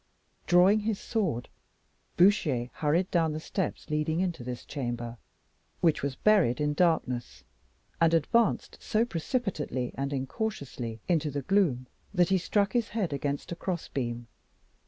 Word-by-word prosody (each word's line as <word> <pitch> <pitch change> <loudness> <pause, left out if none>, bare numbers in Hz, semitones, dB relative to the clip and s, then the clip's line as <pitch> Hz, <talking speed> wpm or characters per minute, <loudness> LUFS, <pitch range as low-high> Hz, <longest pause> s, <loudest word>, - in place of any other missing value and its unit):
Drawing 180 +5 +6
his 215 -1 -1
sword, 180 - -1 0.7
Bouchier 155 - +3
hurried 165 +5 +1
down 165 -3 +2
the 155 - -3
steps 180 +2 -3
leading 150 +2 0
into 175 -8 -1
this 125 0 -6
chamber, 120 -4 -4 0.6
which 165 -4 +2
was 140 -1 -2
buried 190 - +3
in 150 0 +1
darkness, 125 - 0 0.6
and 165 -1 +5
advanced 215 +8 +1
so 220 +2 +1
precipitately 165 - -2
and 140 +1 -3
incautiously 135 - -4
into 160 -4 +1
the 140 -1 -3
gloom, 175 -11 +2 0.3
that 175 -2 +4
he 190 -1 +3
struck 200 +3 +1
his 240 -3 +1
head 205 -9 -1
against 140 +2 -3
a - - -2
crossbeam. 130 -10 -3
160 Hz, 135 wpm, -29 LUFS, 130-190 Hz, 0.7 s, Drawing